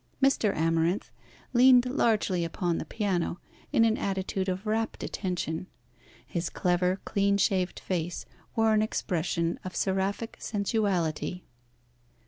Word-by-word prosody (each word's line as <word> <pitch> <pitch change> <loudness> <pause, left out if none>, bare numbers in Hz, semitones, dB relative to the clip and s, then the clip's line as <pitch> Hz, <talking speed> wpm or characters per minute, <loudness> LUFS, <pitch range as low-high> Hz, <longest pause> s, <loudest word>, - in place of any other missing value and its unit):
Mr. 270 -6 +3
Amarinth 165 +3 +1 0.4
leaned 250 0 +7
largely 220 -8 +1
upon 170 +1 -1
the - - -4
piano, 185 -5 -1 0.3
in 230 - +5
an 225 -1 +2
attitude 190 0 -1
of 185 +3 -3
rapt 220 +1 -1
attention. 180 -3 -3 0.6
His 170 +5 -3
clever, 180 +1 +1
clean 200 0 +2
shaved 190 -2 +1
face 175 -2 -3 0.3
wore 225 -1 +4
an 215 - +4
expression 170 -5 -1
of 185 - -7
seraphic 195 +3 -1
sensuality. 190 -5 -1
190 Hz, 115 wpm, -28 LUFS, 175-215 Hz, 0.6 s, leaned